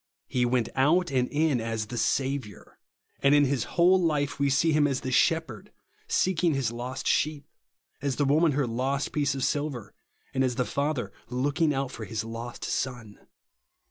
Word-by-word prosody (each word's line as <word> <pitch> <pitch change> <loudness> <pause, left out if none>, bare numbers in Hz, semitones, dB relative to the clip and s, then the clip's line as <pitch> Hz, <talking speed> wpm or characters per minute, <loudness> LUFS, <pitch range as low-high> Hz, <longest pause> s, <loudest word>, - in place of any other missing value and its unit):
He 125 -1 0
went 120 -2 +1
out 160 +5 +3
and 125 -2 +1
in 150 -4 +1
as 115 -1 -2
the 120 - -7
Saviour; 130 -2 -2 0.4
and 140 +1 +5
in 145 0 +5
his 130 -5 0
whole 180 +2 +5
life 150 -5 0
we 140 0 +2
see 150 +4 +3
him 150 -1 +3
as 135 -3 -2
the 130 - -4
Shepherd 145 - +1 0.4
seeking 175 -4 +1
his 130 -5 0
lost 125 +3 -5
sheep, 150 -2 +1 0.6
as 140 -2 -1
the 145 - +1
woman 155 +3 +3
her 140 0 +1
lost 130 +4 -1
piece 140 -2 0
of 135 - -3
silver, 145 -7 -2 0.4
and 130 - +1
as 125 -2 0
the 125 0 0
father 140 -9 -2 0.2
looking 145 +6 +1
out 135 -2 -2
for 110 - -7
his 110 -1 -3
lost 115 +1 -7
son. 120 -5 -3
135 Hz, 175 wpm, -27 LUFS, 125-150 Hz, 0.6 s, and